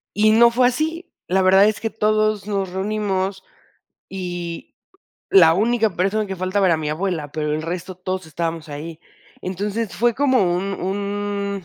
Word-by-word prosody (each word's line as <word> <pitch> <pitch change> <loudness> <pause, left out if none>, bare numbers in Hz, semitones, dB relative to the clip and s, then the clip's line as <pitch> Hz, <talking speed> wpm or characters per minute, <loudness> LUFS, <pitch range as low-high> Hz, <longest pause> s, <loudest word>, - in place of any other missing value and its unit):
Y 215 +1 +4
no 235 +2 +6
fue 245 +1 +4
así, 320 +7 -2 0.2
la 190 +2 +2
verdad 190 +1 +6
es 215 - -1
que 225 - -2
todos 215 -1 0
nos 195 -3 -2
reunimos 190 -1 -2 0.7
y, 175 -3 -5 0.7
la 165 -4 +7
única 225 +3 +2
persona 200 +4 0
que 190 -1 -5
faltaba 185 +2 +1
era 170 -3 +3
mi 155 -1 -3
abuela, 160 -3 -3
pero 150 -1 -1
el 155 - -3
resto 180 +2 -5
todos 185 -1 -4
estábamos 165 0 -4
ahí, 155 +3 -7 0.4
entonces, 205 +4 -3
fue 235 +4 +2
como 260 -10 +2
un 195 +3 -2
un 200 0 -3
195 Hz, 160 wpm, -21 LUFS, 175-215 Hz, 0.7 s, la